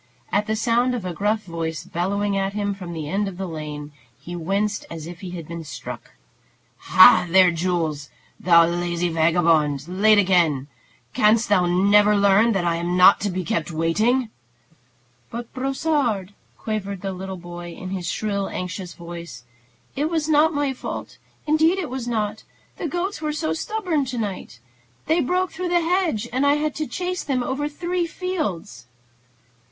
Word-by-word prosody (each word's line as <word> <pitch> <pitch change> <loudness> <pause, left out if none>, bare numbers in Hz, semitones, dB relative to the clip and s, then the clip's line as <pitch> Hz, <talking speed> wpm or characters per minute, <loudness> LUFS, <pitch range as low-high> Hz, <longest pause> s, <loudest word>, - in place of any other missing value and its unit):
At 205 +1 +1
the 220 - 0
sound 240 +3 +1
of 220 -6 -5
a 180 - -3
gruff 210 +4 0
voice 165 -3 -4
bellowing 200 +3 -1
at 195 0 -1
him 205 -1 -1
from 185 -3 -8
the 160 -3 -5
end 200 +5 -1
of 190 -2 -7
the 190 - -3
lane, 150 -3 -6 0.3
he 175 - -8
winced 200 +5 -1
as 165 -2 -7
if 170 +1 -9
he 185 -2 -7
had 170 -3 -7
been 170 0 -6
struck. 140 -5 -8 0.6
"Ha, - - +7
there, 185 0 +6
Jules! 165 -4 -2 0.3
Thou 170 -2 +6
lazy 175 0 -1
vagabond! 160 -3 +2
Late 205 +4 +4
again! 175 -9 +3 0.5
Canst 220 +2 +3
thou 185 -4 +3
never 205 +4 +4
learn 200 +3 +4
that 190 -3 0
I 170 -1 +1
am 175 +1 -1
not 185 +2 +7
to 205 - 0
be 185 0 -3
kept 160 -1 -2
waiting?" 215 +10 +1 1.0
"But, 235 0 -7
Brossard," 265 - -1 0.2
quavered 200 -3 -4
the 195 -1 -3 0.3
boy 175 0 -8
in 185 +2 -8
his 180 -3 -3
shrill, 200 -2 -2
anxious 180 0 -5
voice, 170 -7 -9 0.5
"it 295 +3 0
was 320 -2 -1
not 310 +1 +4
my 290 -3 -1
fault, 255 - -7 0.3
indeed 315 +4 +3
it 350 -9 -4
was 255 -2 -4
not. 215 -2 -2 0.4
The 335 - -3
goats 350 +3 -3
were 305 -1 -2
so 315 +1 -1
stubborn 360 -6 -1
to 250 -1 -5
night. 200 - -5 0.5
They 320 +2 +2
broke 360 +5 0
through 360 +2 -4
the 350 0 +3
hedge, 335 - 0
and 260 +2 +1
I 285 0 +4
had 300 0 -1
to 310 -1 -2
chase 365 0 -3
them 260 -4 -1
over 280 +4 -2
three 345 +3 -2
fields." 250 - -4
200 Hz, 170 wpm, -23 LUFS, 175-265 Hz, 1.0 s, Ha